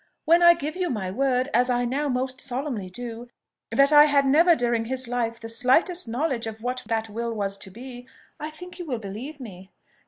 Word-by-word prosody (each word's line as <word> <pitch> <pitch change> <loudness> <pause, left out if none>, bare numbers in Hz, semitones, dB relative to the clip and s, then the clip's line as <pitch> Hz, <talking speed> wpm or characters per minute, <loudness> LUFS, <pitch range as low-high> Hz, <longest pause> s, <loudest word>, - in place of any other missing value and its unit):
When 335 +2 +5
I 345 0 +8
give 310 -1 -5
you 365 -1 -1
my 195 -7 -3
word, 255 +3 0
as 250 +2 +3
I 245 0 +1
now 280 +4 -1
most 255 0 -2
solemnly 250 -7 -4
do, 235 +3 -8 0.4
that 275 +1 +4
I 295 0 +8
had 285 -2 +3
never 330 +6 +5
during 235 -4 0
his 260 +1 -1
life 235 -1 -2
the 225 - -8
slightest 260 +9 +2
knowledge 245 -1 -2
of 220 0 -8
what 250 +1 -2
that 225 -1 -1
will 230 +2 -4
was 200 -3 -3
to - - -8
be, 245 +4 -10 0.3
I 305 0 -5
think 360 +4 -12
you 355 - -5
will 255 -4 -2
believe 225 +9 -8
me." 190 -6 -10
250 Hz, 210 wpm, -24 LUFS, 230-290 Hz, 0.4 s, I